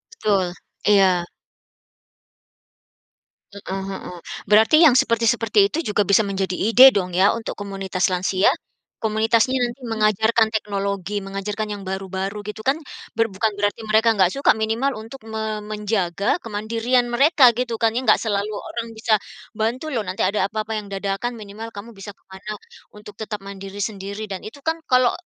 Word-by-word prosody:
Betul, 195 Hz, -, 0 dB, 0.3 s
iya. 190 Hz, -4 st, +4 dB, 2.3 s
Heeh 195 Hz, -1 st, -5 dB
heeh, 180 Hz, -2 st, -7 dB, 0.3 s
berarti 220 Hz, +9 st, +6 dB
yang 300 Hz, -7 st, +7 dB
seperti-seperti 230 Hz, -2 st, +2 dB
itu -, -, -4 dB
juga 210 Hz, -, +2 dB
bisa 200 Hz, +2 st, +5 dB
menjadi 190 Hz, -2 st, -2 dB
ide 245 Hz, +5 st, +8 dB
dong 185 Hz, -7 st, -2 dB
ya 190 Hz, +3 st, +4 dB
untuk 225 Hz, -, -5 dB
komunitas 195 Hz, -2 st, -2 dB
lansia? 185 Hz, +1 st, +2 dB, 0.5 s
Komunitasnya 225 Hz, +4 st, +2 dB
nanti 245 Hz, +2 st, -2 dB
mengajarkan 220 Hz, 0 st, +2 dB
teknologi, 200 Hz, -2 st, -2 dB
mengajarkan 195 Hz, +2 st, -4 dB
yang 200 Hz, -, -9 dB
baru-baru 190 Hz, +1 st, -4 dB
gitu 220 Hz, +1 st, -7 dB
kan 275 Hz, +4 st, +2 dB, 0.3 s
ber 225 Hz, 0 st, +2 dB
bukan 210 Hz, +3 st, 0 dB
berarti 205 Hz, +2 st, 0 dB
mereka 220 Hz, +2 st, +3 dB
nggak 185 Hz, -3 st, +3 dB
suka, 275 Hz, -, +3 dB
minimal 225 Hz, +5 st, 0 dB
untuk 225 Hz, +5 st, -10 dB
me 220 Hz, -1 st, -3 dB
menjaga 210 Hz, -, -1 dB
kemandirian 230 Hz, +3 st, 0 dB
mereka 275 Hz, -1 st, +6 dB
gitu 240 Hz, 0 st, -2 dB
kan 225 Hz, 0 st, +1 dB
ya? 245 Hz, -, -1 dB
Enggak 260 Hz, -, +4 dB
selalu 205 Hz, 0 st, -1 dB
orang 235 Hz, +2 st, -5 dB
bisa 220 Hz, 0 st, +1 dB, 0.5 s
bantu 235 Hz, +6 st, -1 dB
loh 235 Hz, -, 0 dB
nanti 185 Hz, +1 st, -2 dB
ada 195 Hz, 0 st, +1 dB
apa-apa 220 Hz, +1 st, -3 dB
yang 205 Hz, -, -10 dB
dadakan 200 Hz, +5 st, -3 dB
minimal 215 Hz, +1 st, -8 dB
kamu 210 Hz, +4 st, -8 dB
bisa 195 Hz, 0 st, -10 dB
ke -, -, -37 dB
mana 190 Hz, +3 st, -8 dB, 0.5 s
untuk 210 Hz, 0 st, -11 dB
tetap 215 Hz, -1 st, -4 dB
mandiri 195 Hz, 0 st, -8 dB
sendiri 200 Hz, +1 st, -5 dB
dan 195 Hz, -3 st, -6 dB
itu 220 Hz, -, -10 dB
kan 325 Hz, +1 st, 0 dB
kalau 255 Hz, -1 st, +4 dB
215 Hz, 155 wpm, -22 LUFS, 195-230 Hz, 2.3 s, ide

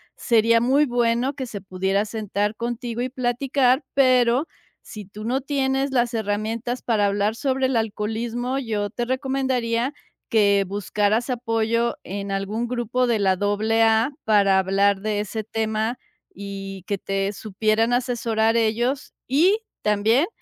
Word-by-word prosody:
sería 230 Hz, -1 st, +3 dB
muy 275 Hz, +5 st, +3 dB
bueno 240 Hz, +2 st, +1 dB
que 260 Hz, -3 st, -5 dB
se 205 Hz, -3 st, -6 dB
pudiera 190 Hz, +2 st, -1 dB
sentar 210 Hz, -1 st, -2 dB
contigo 240 Hz, 0 st, -4 dB
y 255 Hz, -, -1 dB
platicar, 255 Hz, +2 st, +1 dB
pero, 255 Hz, +1 st, +4 dB, 0.4 s
si 210 Hz, -2 st, -9 dB
tú 210 Hz, +3 st, -9 dB
no 260 Hz, +3 st, 0 dB
tienes 270 Hz, 0 st, 0 dB
las 240 Hz, -2 st, +1 dB
herramientas 220 Hz, +3 st, -2 dB
para 210 Hz, -4 st, +2 dB
hablar 205 Hz, +2 st, 0 dB
sobre 265 Hz, 0 st, 0 dB
el 260 Hz, -1 st, 0 dB
alcoholismo, 225 Hz, +4 st, -2 dB
yo 210 Hz, -5 st, -2 dB
te 240 Hz, 0 st, -3 dB
recomendaría, 260 Hz, -2 st, -1 dB, 0.4 s
que 200 Hz, -3 st, +4 dB
buscaras 205 Hz, +4 st, 0 dB
apoyo 230 Hz, -1 st, 0 dB
en 200 Hz, +1 st, -5 dB
algún 205 Hz, +4 st, -2 dB
grupo 250 Hz, +1 st, -1 dB
de 230 Hz, -2 st, +2 dB
la 190 Hz, -2 st, +3 dB
AA, 220 Hz, +4 st, +2 dB
para 200 Hz, -3 st, +4 dB
hablar 195 Hz, +1 st, +2 dB
de 210 Hz, -1 st, -1 dB
ese 210 Hz, +1 st, -3 dB
tema 220 Hz, +2 st, -2 dB, 0.4 s
y 195 Hz, -1 st, -7 dB
que 200 Hz, -, -1 dB
te 195 Hz, 0 st, -1 dB
supieran 215 Hz, +3 st, 0 dB
asesorar 230 Hz, -3 st, +1 dB
ellos, 235 Hz, +4 st, 0 dB
y 350 Hz, -, +3 dB, 0.2 s
también, 215 Hz, -, +2 dB
225 Hz, 140 wpm, -23 LUFS, 205-250 Hz, 0.4 s, pero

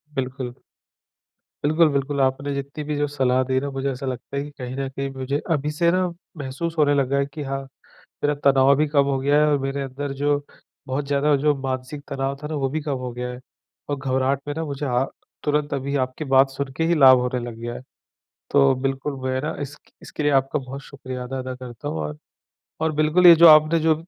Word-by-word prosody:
बिल्कुल। 130 Hz, -1 st, -3 dB, 1.1 s
बिल्कुल, 155 Hz, +2 st, +4 dB
बिल्कुल। 140 Hz, 0 st, -1 dB
आपने 135 Hz, +2 st, 0 dB
जितनी 140 Hz, +2 st, -5 dB
भी 150 Hz, 0 st, -3 dB
जो 145 Hz, -, +1 dB
सलाह 130 Hz, -3 st, +1 dB
दी 130 Hz, 0 st, +2 dB
ना 140 Hz, -, -3 dB
मुझे 135 Hz, +1 st, -2 dB
ऐसा 135 Hz, +1 st, -6 dB
लगता 130 Hz, +2 st, -5 dB
है 140 Hz, -, -1 dB
कि 145 Hz, -, -8 dB
कहीं 125 Hz, -1 st, -6 dB
न 135 Hz, 0 st, -2 dB
कहीं 135 Hz, +1 st, -4 dB
मुझे 135 Hz, +1 st, -2 dB
अभी 150 Hz, -2 st, +1 dB
से 170 Hz, +3 st, +2 dB
ना, 185 Hz, +1 st, +2 dB, 0.3 s
महसूस 145 Hz, +4 st, -4 dB
होने 145 Hz, -2 st, +4 dB
लगा 140 Hz, -1 st, +1 dB
है 140 Hz, -, +2 dB
कि 150 Hz, -, -5 dB
हाँ, 135 Hz, 0 st, -3 dB, 0.6 s
मेरा 145 Hz, -, +3 dB
तनाव 135 Hz, 0 st, +6 dB
भी 150 Hz, +2 st, +2 dB
कम 145 Hz, -1 st, +3 dB
हो 140 Hz, -1 st, 0 dB
गया 145 Hz, +2 st, +3 dB
है -, -, +5 dB
और 145 Hz, -, +3 dB
मेरे 135 Hz, +1 st, -2 dB
अंदर 135 Hz, +1 st, -4 dB
जो 145 Hz, 0 st, +2 dB, 0.5 s
बहुत 135 Hz, +2 st, -2 dB
ज़्यादा 145 Hz, +1 st, +2 dB
जो 150 Hz, -1 st, +4 dB
मानसिक 130 Hz, +2 st, -4 dB
तनाव 135 Hz, 0 st, -2 dB
था 150 Hz, -, -3 dB
ना 155 Hz, -, -4 dB
वो 135 Hz, -2 st, 0 dB
भी 155 Hz, +3 st, -2 dB
कम 145 Hz, -3 st, -2 dB
हो 125 Hz, -1 st, -4 dB
गया 125 Hz, +1 st, -4 dB
है। 125 Hz, 0 st, -7 dB, 0.5 s
और 145 Hz, -, 0 dB
घबराहट 135 Hz, 0 st, 0 dB
में 145 Hz, -, -2 dB
ना 165 Hz, -, -2 dB
मुझे 145 Hz, -1 st, -4 dB
अ, 125 Hz, 0 st, +1 dB, 0.4 s
तुरंत 150 Hz, 0 st, 0 dB
अभी 140 Hz, +1 st, -2 dB
आपकी 130 Hz, +4 st, -8 dB
बात 135 Hz, 0 st, +5 dB
सुन 135 Hz, 0 st, -4 dB
के 160 Hz, -, +1 dB
ही 170 Hz, -, +3 dB
लाभ 135 Hz, -4 st, +8 dB
होने 125 Hz, 0 st, -1 dB
लग 115 Hz, -, -9 dB
गया 120 Hz, 0 st, -4 dB
है। -, -, -7 dB, 0.7 s
तो 140 Hz, -1 st, +5 dB
बिल्कुल 135 Hz, +1 st, -2 dB
मैं 130 Hz, 0 st, -1 dB
ना 150 Hz, -, -3 dB
इस 145 Hz, +1 st, -5 dB, 0.3 s
इसके 150 Hz, -, -6 dB
लिए 145 Hz, -, +3 dB
आपका 135 Hz, +2 st, -3 dB
बहुत 135 Hz, +1 st, -8 dB
शुक्रिया 130 Hz, -3 st, -7 dB
अदा 130 Hz, +1 st, -5 dB
अदा 130 Hz, 0 st, -5 dB
करता 125 Hz, +2 st, -8 dB
हूँ। 80 Hz, -, -3 dB
और 75 Hz, 0 st, -5 dB, 0.6 s
और 160 Hz, 0 st, +1 dB
बिल्कुल 155 Hz, +4 st, +4 dB
ये 170 Hz, -, +11 dB
जो 170 Hz, 0 st, +9 dB
आपने 155 Hz, +2 st, +7 dB
जो 160 Hz, 0 st, +4 dB
140 Hz, 225 wpm, -23 LUFS, 130-145 Hz, 1.1 s, ये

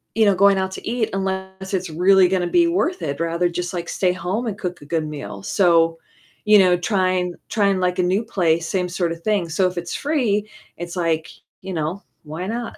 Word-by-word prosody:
you 220 Hz, -1 st, +4 dB
know, 200 Hz, -2 st, +4 dB
going 200 Hz, +1 st, +5 dB
out 190 Hz, 0 st, -1 dB
to -, -, -8 dB
eat 230 Hz, -1 st, 0 dB
unless 190 Hz, 0 st, -4 dB
it's 185 Hz, -2 st, -1 dB
really 185 Hz, +3 st, +5 dB
gonna 180 Hz, -1 st, 0 dB
be 340 Hz, -, +3 dB
worth 360 Hz, +1 st, 0 dB
it, 140 Hz, +1 st, -3 dB
rather 170 Hz, +1 st, 0 dB
just, 175 Hz, +1 st, -4 dB
like, 170 Hz, -1 st, -4 dB
stay 185 Hz, -2 st, +1 dB
home 185 Hz, +7 st, -3 dB
and 205 Hz, -2 st, -3 dB
cook 180 Hz, -4 st, -5 dB
a -, -, -12 dB
good 160 Hz, 0 st, -1 dB
meal, 100 Hz, -9 st, -7 dB
so, 165 Hz, -, +3 dB, 0.5 s
you 210 Hz, 0 st, +7 dB
know, 180 Hz, -2 st, +5 dB
trying 185 Hz, -1 st, 0 dB
trying, 200 Hz, -3 st, +2 dB
like, 180 Hz, 0 st, 0 dB
a -, -, +3 dB
new 190 Hz, +5 st, +1 dB
place, 170 Hz, -6 st, 0 dB
same 180 Hz, -2 st, -1 dB
sorta 170 Hz, -2 st, -1 dB
thing, 195 Hz, -1 st, 0 dB
so 185 Hz, +3 st, +2 dB
if 180 Hz, -1 st, -6 dB
it's 175 Hz, 0 st, -4 dB
free, 225 Hz, -9 st, 0 dB, 0.3 s
it's 175 Hz, +1 st, -6 dB
like, 165 Hz, -2 st, -1 dB, 0.3 s
you 190 Hz, -, -7 dB
know, 165 Hz, +5 st, -3 dB, 0.2 s
why 160 Hz, +5 st, -6 dB
not? 235 Hz, +1 st, -4 dB
185 Hz, 210 wpm, -21 LUFS, 170-200 Hz, 0.5 s, you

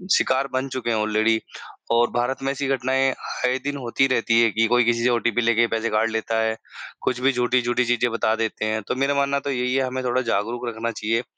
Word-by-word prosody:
शिकार 130 Hz, +1 st, +1 dB
बन 130 Hz, +1 st, -1 dB
चुके 130 Hz, -2 st, -4 dB
हैं 115 Hz, -, +1 dB
ऑलरेडी 110 Hz, +1 st, +1 dB, 0.5 s
और 120 Hz, +1 st, +3 dB
भारत 120 Hz, +2 st, -1 dB
में 135 Hz, -, 0 dB
ऐसी 140 Hz, 0 st, -3 dB
घटनाएँ 135 Hz, 0 st, +1 dB, 0.3 s
आए 125 Hz, +1 st, +1 dB
दिन 145 Hz, 0 st, -3 dB
होती 135 Hz, +1 st, +1 dB
रहती 115 Hz, -2 st, +2 dB
हैं 115 Hz, -2 st, +3 dB
कि 115 Hz, -, +2 dB
कोई 120 Hz, +1 st, +3 dB
किसी 115 Hz, 0 st, +1 dB
से 125 Hz, -, +3 dB
ओटीपी 120 Hz, 0 st, +1 dB
लैके 115 Hz, 0 st, +3 dB
पैसे 115 Hz, 0 st, -1 dB
काट 110 Hz, +2 st, +1 dB
लेता 110 Hz, 0 st, -1 dB
है। 110 Hz, 0 st, 0 dB, 0.5 s
कुछ 125 Hz, -, -1 dB
भी 135 Hz, +1 st, +4 dB
झूठी-झूठी 125 Hz, 0 st, +1 dB
चीज़ें 120 Hz, 0 st, +1 dB
बता 110 Hz, -1 st, +1 dB
देते 110 Hz, -1 st, -2 dB
हैं। 110 Hz, 0 st, -1 dB
तो -, -, -1 dB
मेरा 135 Hz, +2 st, +1 dB
मानना 140 Hz, 0 st, +1 dB
तो 140 Hz, +1 st, -4 dB
यही 125 Hz, -1 st, -1 dB
है, 135 Hz, -, +2 dB
हमें 130 Hz, 0 st, -3 dB
थोड़ा 125 Hz, +1 st, +1 dB
जागरूक 120 Hz, +1 st, -2 dB
रखना 115 Hz, 0 st, -3 dB
चाहिए। 115 Hz, +2 st, -1 dB
120 Hz, 225 wpm, -23 LUFS, 115-130 Hz, 0.5 s, भी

